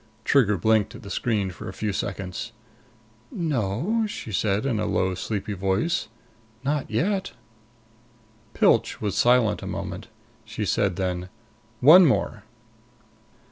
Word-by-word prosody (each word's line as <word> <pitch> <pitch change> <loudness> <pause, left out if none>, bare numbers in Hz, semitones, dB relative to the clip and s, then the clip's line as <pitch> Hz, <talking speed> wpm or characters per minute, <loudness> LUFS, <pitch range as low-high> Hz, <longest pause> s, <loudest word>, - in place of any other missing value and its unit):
Trigger 110 -8 +3
blinked 110 +2 +2
at - - -11
the 100 - -8
screen 100 -3 -1
for 90 - -8
a - - -8
few 105 +1 -3
seconds. 100 +4 -4 0.8
"No," 155 - -1
she 160 - -7
said 100 +4 0
in 120 -6 0
a - - -1
low, 95 0 0
sleepy 100 +2 -4
voice. 100 - 0 0.6
"Not 145 0 -1
yet." 190 - -1 1.2
Pilch - - +3
was 105 -3 -2
silent 120 -3 +3
a - - -6
moment. - - -5 0.4
She - - -4
said 95 -3 +1
then, 90 -1 -3 0.5
"One 165 +7 +9
more." 120 -5 0
110 Hz, 130 wpm, -25 LUFS, 95-135 Hz, 1.2 s, One